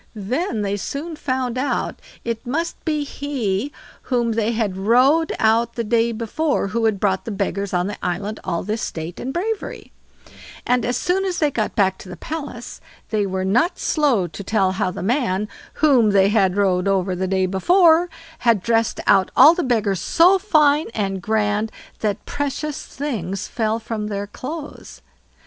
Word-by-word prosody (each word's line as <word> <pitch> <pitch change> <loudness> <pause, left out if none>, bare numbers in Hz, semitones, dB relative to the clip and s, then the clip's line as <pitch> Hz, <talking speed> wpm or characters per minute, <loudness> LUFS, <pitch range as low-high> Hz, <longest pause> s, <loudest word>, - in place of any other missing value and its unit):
Then 225 - -2
they 200 0 -1
soon 300 - -5
found 255 -3 -2
out 280 - -2 0.3
it 230 -1 -3
must 330 +7 -3
be 305 -2 0
he 275 -5 -2 0.4
whom 240 -3 +1
they 225 0 0
had 220 -5 -1
rowed 255 +11 +3
out 230 +1 +2
the 235 - -1
day 230 +1 +2
before 230 +2 -1
who 225 +3 0
had 215 -3 +1
brought 190 -2 +1
the - - -4
beggars 200 -1 -2
on 180 -1 +1
the 205 +1 -6
island 195 +5 -3
all 170 -3 -2
this 215 +3 -3
state 165 +2 -5
and 260 - -4
bravery; 405 +7 -4 0.7
and 250 -1 +2
as 245 - 0
soon 375 +2 0
as 370 -2 -2
they 300 -2 +2
got 215 -5 -2
back 190 -3 +2
to 185 - -11
the 180 - -8
palace, 285 - -7 0.3
they 210 -2 +1
were 190 0 -2
not 280 - +2
slow 275 - +1
to 175 +4 -8
tell 195 -2 +1
how 185 -1 -1
the 180 - -6
man, 210 -3 0 0.3
whom 265 -8 +4
they 195 -1 +4
had 200 -3 +2
rowed 190 -2 +2
over 190 -1 +1
the 190 +1 -2
day 190 0 +1
before, 335 - +4 0.3
had 230 -6 +2
dressed 230 -1 +1
out 195 -2 +4
all 315 - +9
the 355 - -1
beggars 215 - 0
so 360 - +4
fine 305 -6 +3
and 195 -3 -2
grand 215 +1 0 0.3
that 210 -2 -2
precious 290 +1 -3
things 200 - -4
fell 220 -1 -1
from 220 -2 -4
their 200 -1 -3
clothes. 285 +8 -8
225 Hz, 175 wpm, -21 LUFS, 195-285 Hz, 0.7 s, all